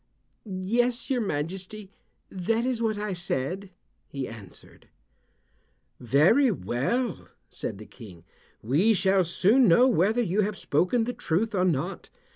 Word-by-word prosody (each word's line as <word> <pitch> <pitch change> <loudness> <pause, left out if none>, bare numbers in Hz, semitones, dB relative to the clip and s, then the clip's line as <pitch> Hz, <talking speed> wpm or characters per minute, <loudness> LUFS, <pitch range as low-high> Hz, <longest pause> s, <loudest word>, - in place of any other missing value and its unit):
"Yes, 235 +7 -1
your 250 -2 +1
majesty, 190 +4 -5 0.4
that 225 +6 -1
is 250 -3 -1
what 220 -2 0
I 210 -1 -3
said," 175 +2 -3 0.4
he 135 -2 -5
answered. 105 -5 -12 1.1
"Very 160 - +4
well," 180 - -2 0.2
said - - -5
the 105 - -11
King. 95 -10 -13 0.4
"We 165 - +3
shall 190 0 +3
soon 205 +9 +3
know 235 +9 +6
whether 220 +1 +2
you 200 +1 +1
have 205 -1 -2
spoken 180 - +1
the 245 +2 -3
truth 210 +5 -1
or 185 -2 +1
not. 175 +2 -2
190 Hz, 130 wpm, -26 LUFS, 160-225 Hz, 1.1 s, know